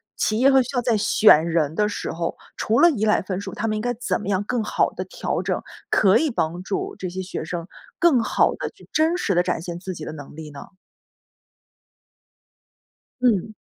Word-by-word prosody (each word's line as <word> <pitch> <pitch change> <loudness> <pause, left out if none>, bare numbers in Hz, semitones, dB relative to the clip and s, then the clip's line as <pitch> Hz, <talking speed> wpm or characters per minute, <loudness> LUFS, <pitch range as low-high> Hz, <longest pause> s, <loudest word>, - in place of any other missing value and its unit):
企 215 +1 0
业 265 +2 +6
和 265 -1 +5
学 245 - -10
校 250 -3 0
在 235 -2 +1
选 200 -5 +5
人 160 -2 0
的 210 +3 +2
时 205 - -4
候， 170 0 -3 0.2
除 225 +2 +1
了 340 - +7
依 225 -9 0
赖 210 - +3
分 185 0 -4
数， 200 - -7
他 225 - -2
们 215 - 0
应 215 - -2
该 245 0 0
怎 245 +1 -2
么 210 - -5
样 195 0 +1
更 235 +2 -1
好 - - +1
地 - - -5
调 - - -3
整， - - -1 0.3
可 195 -2 +5
以 315 -2 +1
帮 175 -4 -2
助 195 - -3
这 185 - -4
些 185 +2 -5
学 185 - -5
生 170 0 -5 0.3
更 335 -8 +5
好 - - +2
地 - - -4
去 - - -20
真 320 +2 +2
实 200 - 0
地 175 - +3
展 165 - -1
现 170 0 -6
自 185 +1 -6
己 160 -3 -8
的 - - -6
能 145 -2 -10
力 155 -1 -8
呢？ 145 -1 -11 2.5
嗯。 220 -3 +2
205 Hz, 230 characters per minute, -23 LUFS, 175-240 Hz, 2.5 s, 了